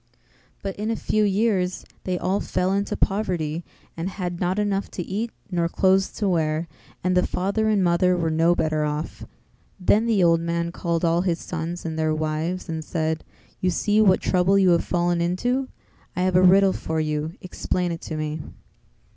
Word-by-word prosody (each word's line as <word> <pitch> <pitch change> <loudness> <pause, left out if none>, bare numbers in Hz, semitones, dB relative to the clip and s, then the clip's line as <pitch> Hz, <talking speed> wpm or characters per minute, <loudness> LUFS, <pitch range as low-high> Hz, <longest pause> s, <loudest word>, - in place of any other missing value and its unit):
But 195 -1 -3
in 210 +2 -2
a 225 - 0
few 215 0 0
years 195 -3 +1 0.2
they 185 -1 -1
all 190 +3 0
fell 185 +1 0
into 200 +1 -1
poverty 175 -6 -1 0.3
and 170 +3 -3
had 180 -3 -4
not 180 +2 0
enough 205 -1 0
to 180 - -5
eat 210 +7 -3 0.2
nor 170 -2 +1
clothes 190 +2 +2
to 210 - -1
wear, 160 -2 0 0.4
and 185 0 +1
the 180 - +3
father 200 +4 0
and 205 -3 +3
mother 180 +1 +3
were 165 -2 0
no 165 +2 +3
better 155 -2 0
off; 150 +1 -4 0.5
then 210 +5 +3
the 210 -5 +3
old 165 -1 +5
man 170 0 -1
called 170 -1 -1
all 170 +1 +3
his 175 -3 0
sons 170 +1 -5
and 160 -1 -3
their 155 0 +1
wives 155 +4 -2
and 160 -2 -4
said 160 0 -2 0.4
"You 185 - +1
see 210 +4 +2
what 190 -3 +4
trouble 185 +1 +3
you 190 -2 +5
have 170 - +3
fallen 175 -1 0
into; 245 +10 0 0.5
I 180 - 0
have 185 -1 +1
a 180 - +6
riddle 190 +1 +6
for 160 0 -3
you, 155 +1 -2
explain 180 -1 -2
it 165 - -5
to 155 - -5
me. 155 0 -3
180 Hz, 190 wpm, -24 LUFS, 165-195 Hz, 0.5 s, a